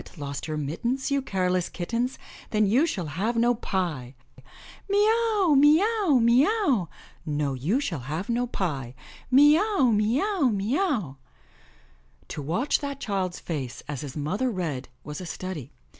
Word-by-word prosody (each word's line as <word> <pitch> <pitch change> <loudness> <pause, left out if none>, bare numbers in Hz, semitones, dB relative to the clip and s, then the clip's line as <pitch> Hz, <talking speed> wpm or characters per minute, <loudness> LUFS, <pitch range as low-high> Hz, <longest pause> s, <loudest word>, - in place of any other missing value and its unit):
lost 140 -1 -5
your 155 -1 -3
mittens. 235 - -2
You 280 0 +2
careless 185 -6 0
kittens. 235 +8 -2 0.3
Then 215 -1 +2
you 250 +11 +3
shall 185 - -3
have 190 +11 -2
no 240 +1 +4
pie,* 170 - -3 0.7
'Mee 400 - +2 0.4
aWy 355 -7 +4
mee 295 +3 +6
aw, 410 - +2
mee 235 +3 +5
aw!' 300 - +1 0.4
'No, 145 -2 -1
you 155 - 0
shall 175 - -3
have 155 +10 -4
no 240 +1 0
pie!' 140 - -3 0.3
'Mee 290 +4 +6
aw, 395 - +2
mee 215 +4 +2
aw, 390 -9 +1
mee 210 +4 -1
aw!' 235 - -1 0.6
" 65 0 -33
To 150 - -5
watch 180 - 0
that 280 -1 -5
child's 195 -7 -2
face 135 -6 -5
as 145 -2 -4
his 145 -4 -7
mothei 170 - -1
read 165 - -3
was 150 +3 -7
a 180 - -6
study. 165 -7 -6
195 Hz, 160 wpm, -26 LUFS, -, 0.7 s, mee